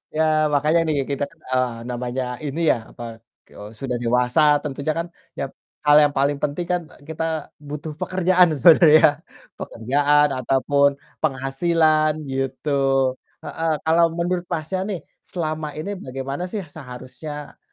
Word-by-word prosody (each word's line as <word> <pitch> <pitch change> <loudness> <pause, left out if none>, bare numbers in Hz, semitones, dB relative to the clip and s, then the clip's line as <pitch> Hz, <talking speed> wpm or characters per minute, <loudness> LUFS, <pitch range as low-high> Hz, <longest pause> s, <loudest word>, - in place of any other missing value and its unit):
Ya 160 - +2 0.2
makanya 150 +3 +2
nih 145 -3 +1
kita 140 +1 -1
kan, 165 +2 -25
eee, 130 -2 +1 0.2
namanya 125 +1 -3 0.2
ini 145 +3 -3
ya - - +1
apa, 120 - -10 0.5
eee, 105 +1 -10
sudah 125 -3 -2
dewasa 125 +4 +1 0.2
tentunya 140 +1 -2
kan 165 +1 -2 0.3
yap - - -3 0.3
hal 150 0 +6
yang 145 - +2
paling 140 +1 +1
penting 145 +4 -1
kan, 180 - +1
eee, 145 - -19
kita 160 -1 -3 0.2
butuh 150 +2 -5
pekerjaan 185 -1 +3
sebenarnya. 155 0 +6 0.4
Pekerjaan 145 +5 +2
ataupun 140 +2 +2 0.2
penghasilan 155 +2 +1
gitu. 135 +2 -2 0.7
Heeh, 165 0 -2
kalau 165 +1 +4
menurut 175 +1 -1
Masnya 170 +3 -2
nih 195 -4 -3 0.3
selama 155 -3 -3
ini 155 +6 -4
bagaimana 135 +4 -5
sih 210 - -3
seharusnya, 145 0 -9
150 Hz, 135 wpm, -22 LUFS, 135-160 Hz, 0.7 s, hal